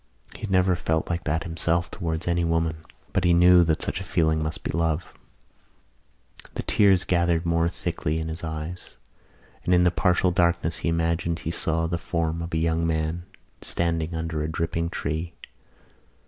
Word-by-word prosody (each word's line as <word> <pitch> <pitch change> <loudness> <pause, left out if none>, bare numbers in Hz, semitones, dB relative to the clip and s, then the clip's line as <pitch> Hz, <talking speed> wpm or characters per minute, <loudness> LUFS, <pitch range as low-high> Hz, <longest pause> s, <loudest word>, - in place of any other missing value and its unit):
He - - -12
had 110 - -4
never 95 -1 +3
felt 80 -1 -1
like 85 0 -3
that 80 +2 0
himself 85 0 0
towards 80 -3 -3
any 85 0 +1
woman 80 -1 0 0.4
but 95 - +1
he 85 -1 +4
knew 90 0 +7
that 80 -1 0
such 90 - -3
a - - -4
feeling 80 -3 +1
must 80 +1 -4
be - - -2
love. 80 0 -1 1.4
The - - -3
tears 95 -3 +4
gathered 85 -1 +1
more 85 0 +2
thickly 80 -2 -3
in 80 0 -3
his 80 +1 -5
eyes 80 +2 -6 0.7
and 90 - +3
in 90 - +4
the 90 - +4
partial 90 0 +2
darkness 85 -2 +1
he - - -1
imagined 85 0 0
he 80 - -4
saw 80 -1 0
the 85 +1 -2
form 85 -2 -2
of 85 +1 -5
a 80 - 0
young 80 0 +1
man 80 +2 -2 0.3
standing 85 -1 -1
under 80 -1 -2
a 75 - -2
dripping 85 +1 -1
tree. 80 +2 -3
85 Hz, 175 wpm, -25 LUFS, 80-85 Hz, 1.4 s, knew